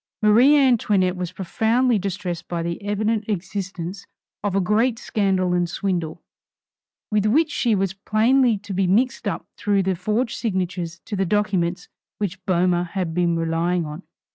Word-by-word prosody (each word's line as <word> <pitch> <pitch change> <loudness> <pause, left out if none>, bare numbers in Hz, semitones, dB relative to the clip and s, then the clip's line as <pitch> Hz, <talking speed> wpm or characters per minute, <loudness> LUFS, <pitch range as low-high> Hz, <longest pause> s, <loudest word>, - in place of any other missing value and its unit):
Marie 240 +8 +6
Antoinette 210 -9 +3
was 180 -1 -4
profoundly 220 +6 +1
distressed 180 -3 -4
by 170 -1 -3
the 170 +2 -4
evident 210 +2 0
existence 195 -1 -4 0.4
of 200 -2 -1
a - - +3
great 220 +5 +2
scandal 190 -5 0
and 175 -1 +1
swindle, 175 -3 -3 0.9
with 210 0 +2
which 305 +8 +3
she 235 -4 +1
was 195 -1 0
plainly 225 +4 +2
to 200 0 -8
be 190 0 +1
mixed 235 +8 +1
up - - -3
through 200 -1 +1
the 190 0 +1
forged 215 +7 -1
signatures 185 -5 -2
to 210 - -4
the 195 - +1
documents 185 -2 0 0.3
which 195 -2 -4
Boehmer 180 -1 +2
had 175 -2 -3
been 170 -1 +1
relying 165 +1 0
on. 150 +3 -7
195 Hz, 155 wpm, -22 LUFS, 180-215 Hz, 0.9 s, Marie